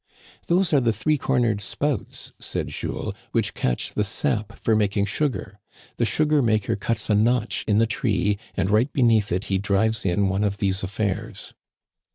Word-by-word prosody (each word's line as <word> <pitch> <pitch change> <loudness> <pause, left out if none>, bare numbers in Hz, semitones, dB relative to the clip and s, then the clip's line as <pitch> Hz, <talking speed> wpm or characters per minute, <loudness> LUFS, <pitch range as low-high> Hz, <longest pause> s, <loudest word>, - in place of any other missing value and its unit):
Those 175 -1 +2
are 145 - +6
the 120 -2 +2
three 145 +8 0
cornered 120 -6 +1
spouts," 145 +7 -3
said - - -3
Jules, - - -4 0.2
"which - - +1
catch 60 -1 -1
the 105 - +1
sap 110 0 -2
for 110 - +1
making 100 -1 +1
sugar. 105 - -2 0.4
The 120 - +2
sugar 150 +4 +2
maker 110 -4 +1
cuts 110 +2 -2
a - - +4
notch 115 +2 +1
in 105 -2 +3
the 115 - +5
tree 105 -3 0 0.2
and 95 0 0
right 115 +6 +3
beneath 115 -6 +3
it 90 +2 0
he 95 -1 -1
drives 105 +2 +1
in 95 +2 +1
one 95 +2 0
of 100 -1 0
these 95 -1 0
affairs." 100 +2 -3
105 Hz, 175 wpm, -24 LUFS, 100-120 Hz, 0.4 s, are